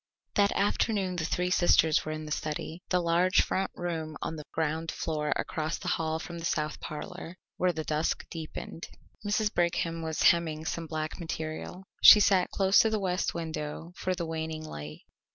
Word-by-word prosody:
That 200 -1 +3
afternoon 200 -2 0
the 165 - -1
three 180 +2 0
sisters 165 -3 +4
were 155 - -4
in 155 0 -5
the 150 - -8
study, 155 +3 -3
the 180 - +3
large 175 +2 +3
front 190 +1 -1
room 160 -3 -4
on 160 - -3
the 150 -2 -8
ground 160 0 -1
floor 150 -2 -2
across 155 +1 -2
the - - -4
hall 160 -1 0
from 170 +1 -7
the 165 - -5
south 150 -2 -1
parlour, 180 +3 -7 0.2
when 180 -2 +1
the 160 - -2
dusk 155 +1 -1
deepened. 165 0 -7 0.4
Mrs. 210 +1 0
Brigham 170 -1 0
was 160 -1 -2
hemming 160 -2 +3
some 165 0 -3
black 155 +1 -4
material. 160 +2 -5 0.2
She 210 - +11
sat 195 -3 +4
close 195 0 +4
to 220 - +5
the 220 -1 0
west 185 -2 -1
window 160 0 -5
for 185 -1 -1
the 170 -1 -3
waning 160 -1 -4
light. 75 - -8
165 Hz, 180 wpm, -29 LUFS, 155-180 Hz, 0.4 s, She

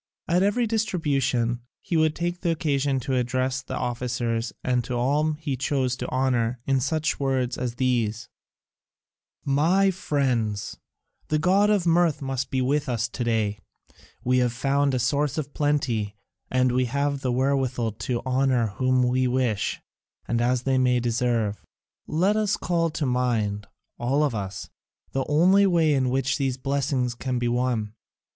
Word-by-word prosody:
At 175 +2 +2
every 205 +5 +2
distribution 140 - 0 0.2
he 180 - -4
would 155 -1 +3
take 175 +1 -3
occasion 145 -5 0
to 130 +2 -2
address 130 +2 0
the 130 - -6
officers 120 -2 -2
and 125 -1 0
all 125 +4 +1
whom 155 0 0
he 150 -3 -3
chose 130 -1 0
to - - -4
honour 125 -2 0
in 135 -1 +2
some 135 +5 0
such 155 - -1
words 130 -3 0
as 120 -2 -3
these: 120 -3 0 1.2
"My 170 +8 +3
friends, 130 - -1 0.5
the 155 - +1
god 195 +6 +3
of 205 -4 +2
mirth 170 -2 +3
must 135 -1 -3
be 130 -1 0
with 145 +2 0
us 115 -1 0
to 120 - -4
day: 110 -3 0 0.6
we 125 +1 +2
have 125 -2 +1
found 140 +2 +1
a - - +2
source 140 +4 0
of 145 -2 -4
plenty, 125 -8 0 0.3
and 130 -1 +2
we 125 +1 +2
have 140 +2 -1
the 130 - 0
wherewithal 130 -2 0
to 120 +3 -3
honour 130 -3 +2
whom 130 -1 +2
we 125 +1 +2
wish 125 -5 0 0.5
and 120 0 0
as 125 +1 +1
they 130 0 +2
may 125 -1 +3
deserve. 120 -3 0 0.4
Let 185 +7 +2
us 215 -1 +1
call 170 -1 0
to 155 -1 -3
mind, 115 -5 0 0.3
all 135 +5 +1
of 145 -4 +1
us, 100 -2 -5 0.4
the 135 0 -1
only 185 +7 +5
way 165 -4 +3
in 130 -2 +1
which 135 +2 0
these 135 -2 0
blessings 135 -2 -1
can 125 +1 -3
be 120 0 0
won. 120 -3 -1
130 Hz, 160 wpm, -25 LUFS, 120-150 Hz, 1.2 s, only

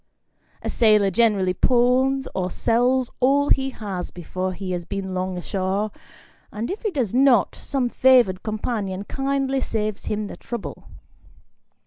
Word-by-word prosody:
A - - -2
sailor 210 -4 +4
generally 200 -3 +2
pawns 260 +4 +2
or 185 -1 -1
sells 245 +5 +1
all 280 +3 +3
he 270 0 +2
has 200 -8 -5
before 185 +2 -4
he 185 0 -5
has 175 -1 -2
been 190 +1 -5
long 185 0 -2
ashore, 195 +3 -2 0.6
and 220 +7 -4
if 405 - -5
he 435 - 0
does 255 - -2
not, 255 -4 +4
some 270 -3 -2
favoured 240 -7 +4
companion 210 -3 -3
kindly 270 +2 -1
saves 215 -3 -3
him 210 0 -2
the - - -8
trouble. 235 -3 -7
215 Hz, 140 wpm, -23 LUFS, 190-260 Hz, 0.6 s, sailor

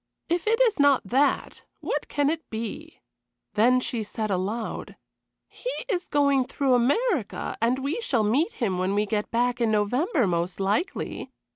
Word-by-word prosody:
If 345 +3 0
it 455 +2 +3
is 450 -8 +3
not 285 -2 +5
that, 275 +4 +1 0.2
what - - -3
can 290 0 +1
it 320 0 -5
be?" 230 +9 -6 0.5
Then 245 +4 +4
she 240 -2 -2
said 215 0 -3
aloud: 205 +5 -3 0.5
"He - - -6 0.2
is 365 -5 -1
going 280 -3 +3
through 270 0 0
America, 280 - +1
and 235 +3 +2
we 280 - -2
shall 250 - +1
meet 275 - +1
him 195 -7 -1
when 185 +2 0
we 210 +1 +2
get 210 0 -2
back 245 +1 0
in 230 - +3
November, 245 - +1
most 175 0 -1
likely. 205 - -2
250 Hz, 160 wpm, -26 LUFS, 215-295 Hz, 0.5 s, not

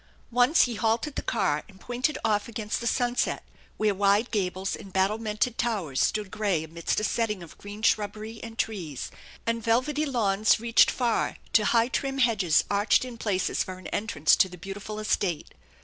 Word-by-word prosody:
Once 245 +7 +5
he 245 - -1
halted 225 +6 0
the - - -3
car 150 -10 0
and 190 -2 -17
pointed 250 +7 -1
off 210 -1 +1
against 225 -2 -3
the 235 - -2
sunset, 245 0 0 0.3
where 215 -1 +2
wide 200 +4 +2
gables 190 -2 -1
and 195 - -11
battlemented 215 +4 0
towers 190 - -1
stood 210 -3 0
gray 200 -7 0
amidst 165 +1 -2
a - - -4
setting 210 -4 -1
of 165 - -13
green 205 +2 -9
shrubbery 215 +1 0
and 225 -1 -9
trees, 180 - -3 0.3
and 230 0 -1
velvety 260 +7 +1
lawns 215 -6 +2
reached 230 0 +5
far, 240 -3 0 0.2
to 215 - +5
high, 230 +1 +3
trim 270 +1 -2
hedges 215 -11 +3
arched 205 +5 +2
in 250 -2 -7
places 205 -5 0
for 185 0 -7
an 185 - -14
entrance 200 -8 +2
to 190 - +3
the 180 - -10
beautiful 200 +3 -7
estate. 195 -6 -1
215 Hz, 175 wpm, -27 LUFS, 195-230 Hz, 0.3 s, Once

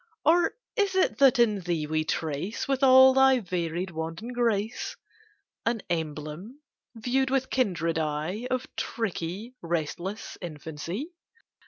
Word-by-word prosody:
Or 340 +1 +4 0.2
is 405 -4 +1
it 265 - +2
that 275 -1 +6
in 220 -4 +3
thee 170 -4 -1
we 155 +1 0
trace, 160 +6 -2
With 270 -1 0
all 260 0 +8
thy 265 0 +6
varied 180 -2 -3
wanton 165 +7 -5
grace, 225 -2 -1 0.7
An 230 -3 -1
emblem, 160 - -4 0.4
viewed 255 +4 0
with 265 -1 0
kindred 170 -10 +1
eye 160 +9 -2
Of 255 0 -1
tricky, 210 +1 -3
restless 170 +5 -3
infancy? 165 - -6
200 Hz, 125 wpm, -27 LUFS, 165-255 Hz, 0.7 s, all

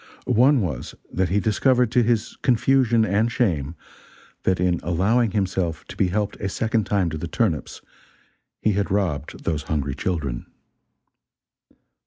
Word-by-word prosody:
One 130 +3 +4
was, 75 -11 -4 0.2
that 95 -1 +1
he 100 +3 +2
discovered, 120 +4 +2
to 125 - +4
his 115 -1 0
confusion 120 -2 +3
and 110 +3 +1
shame, 85 - 0 0.7
that 95 -1 +2
in 90 -1 +1
allowing 100 +8 +2
himself 95 -5 -2
to - - -8
be 95 - +2
helped 105 +3 -2
a 100 - -3
second 110 +1 0
time 95 -5 +1
to 80 - -4
the 85 - -4
turnips, 85 -3 -1 0.8
he 110 - +3
had 100 +1 -1
robbed 90 -8 -2
those 80 -3 -1
hungry 70 -3 -1
children. 75 -7 -3
100 Hz, 145 wpm, -23 LUFS, 85-115 Hz, 0.8 s, One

